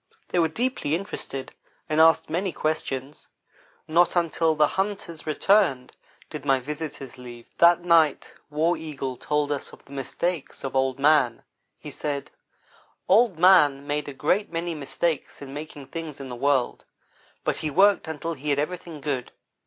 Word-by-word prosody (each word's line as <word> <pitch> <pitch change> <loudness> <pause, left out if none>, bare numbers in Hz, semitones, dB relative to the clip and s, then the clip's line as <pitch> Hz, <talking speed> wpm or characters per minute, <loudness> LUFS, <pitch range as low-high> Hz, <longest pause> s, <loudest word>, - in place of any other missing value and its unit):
They 180 - +1
were 165 - +4
deeply 220 - -1
interested, 150 -7 -5 0.3
and 155 +1 +3
asked 160 0 +5
many 180 +4 -1
questions. 145 -3 -3 0.6
Not 170 +3 +3
until 165 -2 +2
the 150 0 +5
hunters 190 -5 -3
returned 155 -5 +2 0.3
did 150 -3 -7
my 135 -2 +3
visitors 145 -1 -7
leave. 120 -1 -10
That 170 0 +6
night 165 -3 +3 0.2
War 160 +4 +1
Eagle 140 -5 -5
told 150 +3 -1
us 145 - -3
of - - -16
the - - -18
mistakes 140 +4 -3
of 135 -1 -4
Old 130 -1 +1
man. 140 -4 +3 0.3
He - - -9
said: 145 -2 -4 0.8
"Old 210 -2 +4
man 150 -6 +5
made 145 0 -2
a - - -7
great 180 +9 0
many 170 0 -2
mistakes 155 +1 -3
in 140 -1 -9
making 145 -1 -8
things 155 +1 -7
in 135 -1 -7
the 125 - -5
world, 135 0 +1 0.6
but - - 0
he 155 - -3
worked 195 +4 +4
until 160 +1 -4
he 150 0 -5
had 140 - +2
everything 165 0 -4
good. 135 -4 -3
150 Hz, 160 wpm, -25 LUFS, 140-170 Hz, 0.8 s, That